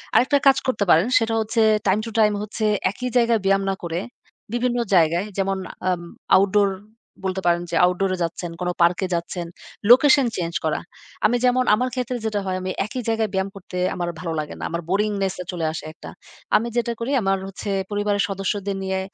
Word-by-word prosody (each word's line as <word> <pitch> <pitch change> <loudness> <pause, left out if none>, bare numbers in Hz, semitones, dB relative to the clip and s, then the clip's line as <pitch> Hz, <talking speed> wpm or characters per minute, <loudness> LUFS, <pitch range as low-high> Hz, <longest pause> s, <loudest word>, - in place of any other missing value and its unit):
আরেকটা 275 +3 +4
কাজ 270 - +6
করতে 215 -5 +1
পারেন 170 +8 +5
সেটা 225 0 -1
হচ্ছে 225 +1 0 0.3
টাইম 190 +2 +3
টু 225 - -6
টাইম 210 -1 +4
হচ্ছে 215 +1 -3 0.3
একই 250 +5 -4
জায়গায় 235 -2 +3
ব্যায়াম 195 0 +3
না 195 - 0
করে, 170 0 -2 0.5
বিভিন্ন 245 0 0 0.2
জায়গায় 170 +3 +3
যেমন: 195 0 0 0.3
আম 180 -1 0 0.4
আউটডোর 200 +1 +3 0.6
বলতে 190 0 -1
পারেন 175 0 +3
যে - - -1
আউটডোরে 185 +1 0
যাচ্ছেন, 170 +1 -4
কোন 180 - 0
পার্কে 175 +2 +3
যাচ্ছেন, 170 +1 -4 0.4
লোকেশন 275 +2 +7
চেঞ্জ 170 -1 -3
করা। 155 - 0 0.5
আমি 245 +3 +3
যেমন 250 +1 +3
আমার 250 +4 -1
ক্ষেত্রে 250 -1 -2
যেটা 215 -2 0
হয়, 185 -1 -1
আমি 185 - -3
একই 250 +4 -5
জায়গায় 225 -2 0
ব্যায়াম 190 +1 0
করতে 180 -1 -8 0.2
আমার 175 -1 -2
ভালো 165 -2 -3
লাগে 150 -1 -4
না। - - -6
আমার 170 +1 -3
বোরিংনেস 200 -1 0
আ - - -22
চলে 170 -3 -3
আসে 160 - -6
একটা। - - -11 0.5
আমি 230 - -2
যেটা 235 0 +1
করি, 235 +4 -2
আমার 195 -1 +1
হচ্ছে 195 +2 -7 0.2
পরিবারের 205 -1 +1
সদস্যদের 195 +1 -2
নিয়ে 190 0 -1
195 Hz, 190 wpm, -22 LUFS, 180-225 Hz, 0.6 s, লোকেশন